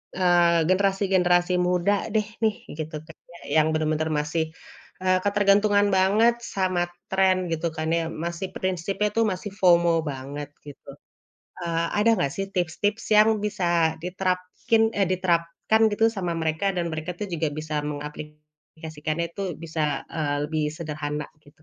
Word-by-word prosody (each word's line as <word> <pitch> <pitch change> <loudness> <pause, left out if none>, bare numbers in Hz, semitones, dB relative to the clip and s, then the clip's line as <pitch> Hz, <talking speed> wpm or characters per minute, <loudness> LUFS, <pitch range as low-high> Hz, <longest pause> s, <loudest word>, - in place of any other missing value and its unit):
eee, 175 -2 +4
generasi-generasi 185 -2 +2
muda 180 +4 +1
deh 215 - +2 0.2
nih, 220 -1 +3 0.2
gitu 155 0 -5
kan 160 0 -15 0.3
ya, 150 +2 +2
yang 155 - +1
bener-bener 155 0 0
masih 155 +2 -1 0.6
eee, 185 0 +3
ketergantungan 205 0 +3
banget 215 +5 +4
sama 185 -4 -1 0.2
trend 190 -1 +2
gitu 165 +1 -1
kan 160 0 -4
ya, 165 0 +1
masih 170 +3 -4
prinsipnya 190 +3 -1
itu, 230 - +3
masih 200 -2 -2
FOMO 170 -2 +4
banget 140 +2 -7 0.2
gitu. 140 -1 -12 0.7
Eee, 170 -1 0
ada 225 +2 +4
enggak 140 -10 0
sih 195 - -2
tips-tips 185 +4 -1
yang 215 +1 +7 0.2
bisa 175 -6 +1
diterapkin 185 +5 0
eh 200 - +1
diterapkan 180 +3 +1
gitu 225 +2 +2
sama 180 -3 -2
mereka 160 +5 0
dan 175 -1 0
mereka 155 +2 -4
tuh 210 - -3
juga 160 -2 0
bisa 155 0 -5 0.2
mengaplikasikannya 150 +2 -6
itu 200 - -4 0.2
bisa 160 -1 -4 0.3
eee, 150 -3 -1
lebih 155 0 -1
sederhana, 150 -2 -4 0.2
gitu? 150 +2 -22
175 Hz, 140 wpm, -25 LUFS, 155-195 Hz, 0.7 s, yang